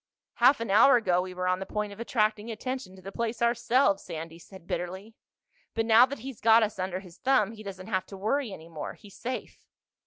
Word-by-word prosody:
"Half 280 - +5
an 230 -4 -2
hour 225 +7 +7
ago 185 -7 +2
we 185 0 -7
were 185 0 -2
on 185 0 +1
the 190 - -4
point 210 -1 -3
of 200 - -14
attracting 215 -2 0
attention 235 -3 -5
to 185 - -15
the 195 - -7
place 230 +2 -3
ourselves," 235 -2 +2
Sandy 165 +1 -7
said 190 0 -14
bitterly. 190 +5 -5 0.6
"But 225 0 +1
now 230 +2 +7
that 280 +2 -6
he's 270 -5 -8
got 225 0 +6
us 210 -2 -3
under 185 0 -2
his 180 -3 -15
thumb 255 -6 +2
he 220 -1 -11
doesn't 190 -3 -8
have 190 -4 -2
to 195 - -9
worry 225 +5 -1
any 165 -3 -10
more. 160 -3 -6
He's 205 -3 -16
safe." 255 +1 -5
210 Hz, 220 wpm, -28 LUFS, 185-230 Hz, 0.6 s, hour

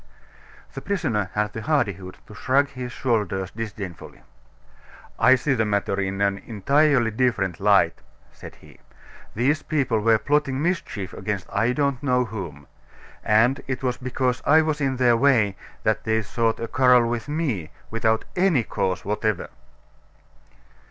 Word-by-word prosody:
The - - -6
prisoner 125 - -1
had 105 0 -1
the 110 - -5
hardihood 100 - -1
to - - -13
shrug 135 +5 +1
his 125 -2 -7
shoulders 100 -7 -1
disdainfully. 100 -6 -8 1.0
"I 130 +3 +6
see 135 +2 0
the 110 -4 +1
matter 100 -2 -1
in 95 +1 -3
an 100 -1 +1
entirely 125 +3 +2
different 110 -7 0
light," 100 -4 +3 0.3
said - - -12
he. - - -18 0.6
"These 140 +7 +1
people 130 -7 0
were 110 +1 +4
plotting 145 +1 0
mischief 150 - -2
against 105 -3 -4
I 115 +5 +1
don't 140 -3 0
know 125 -3 +1
whom 90 - -7 0.6
and 115 +6 +3
it 130 0 -4
was 125 -1 -1
because 125 -1 -2
I 160 +2 +5
was 155 -1 -2
in 135 -2 0
their 120 -2 +4
way 115 -6 +3 0.3
that - - 0
they 110 0 0
sought 115 +2 -1
a 115 - -3
quarrel 125 -1 +4
with 120 +1 -3
me, 135 - -2 0.2
without 110 0 0
any 180 -9 +3
cause 95 -3 -2
whatever." 105 0 -1
115 Hz, 145 wpm, -23 LUFS, 105-135 Hz, 1.0 s, I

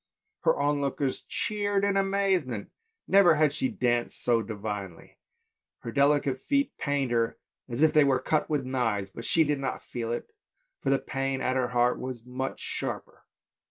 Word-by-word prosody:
The - - +4
onlookers 140 -1 0
cheered 205 -1 0
her 200 - +3
in - - -2
amazement, 195 - 0 0.4
never 190 -4 +6
had 150 -1 +3
she 265 - 0
danced 120 - 0
so 120 -2 +3
divinely; 105 -5 -6 0.6
her 115 - -5
delicate 140 -1 +2
feet 280 -1 0
pained 140 -3 0
her 115 -1 +1 0.3
as 120 +5 0
if 155 -1 +5
they 155 -2 +6
were 135 -2 +3
cut 150 +4 0
with 145 -4 0
knives, 115 -7 -1
but 115 +4 -8
she 165 - +4
did 145 -2 0
not 135 -1 -3
feel 115 -2 -4
it, 120 - -4 0.5
for - - -1
the 135 - +4
pain 135 0 -2
at 130 - 0
her 130 -2 +1
heart 125 0 +2
was 125 -2 -6
much 130 +2 -4
sharper. - - -4
135 Hz, 170 wpm, -28 LUFS, 120-155 Hz, 0.6 s, never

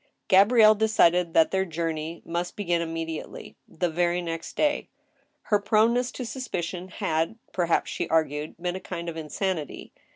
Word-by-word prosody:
Gabrielle 215 +3 +7
decided 180 -6 +3
that 160 - +5
their 190 0 +1
journey 165 -1 -4
must 175 +1 -3
begin 175 -4 0
immediately— 165 -1 -5
the 175 +2 -2
very 175 +1 0
next 165 -1 -5
day. 295 -1 0 0.5
Her 210 - +2
proneness 230 +4 +2
to 255 - -5
suspicion 185 -8 -4
had, 165 +3 -2 0.2
perhaps, 170 -2 +1
she - - -3
ai^gued, 155 -1 0
been 175 +1 -2
a - - -4
kind 170 -2 -5
of 165 - -7
insanity. 160 0 -4
175 Hz, 150 wpm, -26 LUFS, 165-200 Hz, 0.5 s, Gabrielle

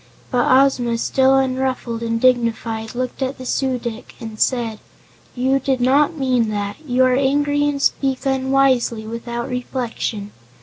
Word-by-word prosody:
But 245 -2 +2
Ozma, 255 -3 +3
still 265 +3 +3
unruffled 260 -3 -1
and 230 0 -1
dignified, 230 -2 0
looked 255 +2 -4
at 265 +1 -2
the 255 - -9
Su 260 0 0
dic 235 0 -7
and 220 -1 -8
said: 230 -4 0 0.6
"You 265 +2 +1
did 265 -1 -1
not 285 +6 +3
mean 250 -5 +1
that. 205 -1 -3
You 255 -3 +2
are 255 - +3
angry 290 +2 +1
and 285 -1 -3
speak 270 -1 0
unwisely, 265 -4 +1
without 235 +2 -5
reflection. 240 -5 -4
255 Hz, 145 wpm, -20 LUFS, 230-265 Hz, 0.6 s, Ozma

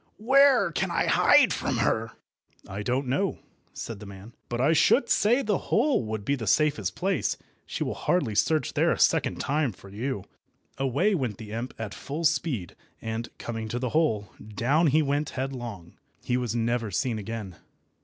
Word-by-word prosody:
Where 260 -4 +5
can - - -1
I - - +1
hide - - +5
from - - -2
her?" - - 0 0.5
"I 100 +2 -5
don't 125 +5 -1
know," 165 +10 0 0.3
said 115 -4 -7
the 105 - -10
man, 100 +3 -11 0.2
"but 120 - -3
I 140 +6 +4
should 245 - +4
say 240 +6 +3
the 210 -3 0
hole 260 - +2
would 110 -2 -4
be 140 - +1
the 120 -6 -3
safest 110 -9 +2
place. 190 -4 0 0.3
She - - -3
will - - -2
hardly 155 -12 0
search 155 +9 +1
there - - +3
a - - 0
second - - +2
time 145 -2 0
for 100 - -15
you." 105 +1 -3 0.6
Away 140 - +2
went 125 - -2
the 110 -2 -9
imp 115 +4 -5
at 110 -3 -5
full 150 +4 -5
speed, 145 - 0 0.2
and, 115 +1 -4
coming 115 -1 -5
to 120 - -3
the 125 0 -2
hole, 115 -9 +1
down 125 +10 +1
he 155 +2 +3
went 145 +1 0
headlong. 120 -10 -5 0.2
He 125 - 0
was 120 -3 -1
never 115 -1 0
seen 115 +3 -1
again. 105 -4 -6
125 Hz, 180 wpm, -27 LUFS, 110-155 Hz, 0.6 s, Where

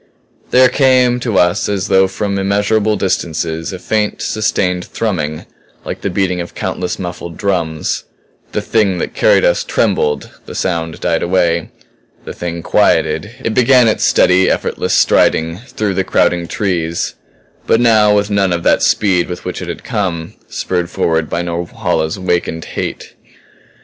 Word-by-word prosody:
There 130 0 +6
came 125 -2 +3
to 115 -5 -1
us 90 +4 +2
as 100 -2 -1
though 95 0 +4
from 100 +1 -2
immeasurable 105 +2 +1
distances, 80 -3 -2
a 95 - -5
faint, 105 +3 -1
sustained 90 -4 0
thrumming 80 -10 -3 0.4
like - - -5
the - - -1
beating 90 -1 0
of 85 - -8
countless 90 -1 -3
muffled 85 -2 -6
drums. 85 -6 -1 0.5
The - - -2
Thing 105 -5 +1
that - - -3
carried - - +3
us - - +2
trembled 75 0 0 0.2
the - - -8
sound 85 -3 -2
died 85 -2 0
away. 85 -2 +1 0.6
The - - -6
Thing 85 -1 -5
quieted; - - +2
it 115 - -1
began 125 0 +5
its 110 - +1
steady, 90 +1 +4
effortless - - -1
striding 80 +2 +2
through 110 -4 -3
the 95 0 0
crowding 85 -2 +1
trees 85 -5 -2 0.5
but 115 - +4
now 110 -3 +4
with 105 0 0
none 100 -2 +2
of 85 -1 -1
that - - +3
speed 95 -5 +2
with 90 0 -6
which - - -4
it - - -6
had - - -6
come, 85 -5 -3
spurred 90 -2 -2
forward 80 -2 0
by 85 +1 -2
Norhala's 85 -1 -2
awakened 85 -3 -1
hate. - - -5
95 Hz, 155 wpm, -15 LUFS, 85-105 Hz, 0.6 s, There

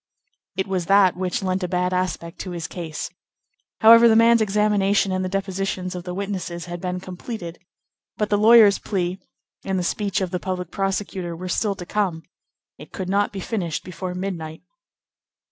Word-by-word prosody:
It 190 - 0
was 185 -3 -2
that 195 -1 +5
which 185 +1 -2
lent 185 0 0
a - - 0
bad 180 0 0
aspect 180 -2 -2
to 185 - -5
his 170 -2 -5
case. 165 -4 -6 0.7
However, 230 +1 +9
the 225 - +5
man's 230 0 +6
examination 205 -1 +2
and 185 0 -1
the 185 - -2
depositions 195 -1 -2
of 180 -1 -7
the 180 - -4
witnesses 185 -3 -4
had 175 -1 -7
been 180 0 -3
completed, 180 -1 -7 0.6
but 210 0 -1
the 205 - +4
lawyer's 215 -2 +7
plea, 185 -2 -2 0.4
and 190 -1 -1
the 180 - -1
speech 200 +3 -1
of 185 -3 -2
the 180 - -2
public 180 -2 -4
prosecutor 195 -3 -2
were 180 +2 -6
still 200 +3 0
to 180 -3 -8
come; 180 -4 -1 0.6
it - - -12
could 185 -1 -5
not 200 +1 +1
be 195 - -6
finished 175 -7 -3
before 185 0 -6
midnight. 170 -4 -5
185 Hz, 180 wpm, -23 LUFS, 180-200 Hz, 0.7 s, However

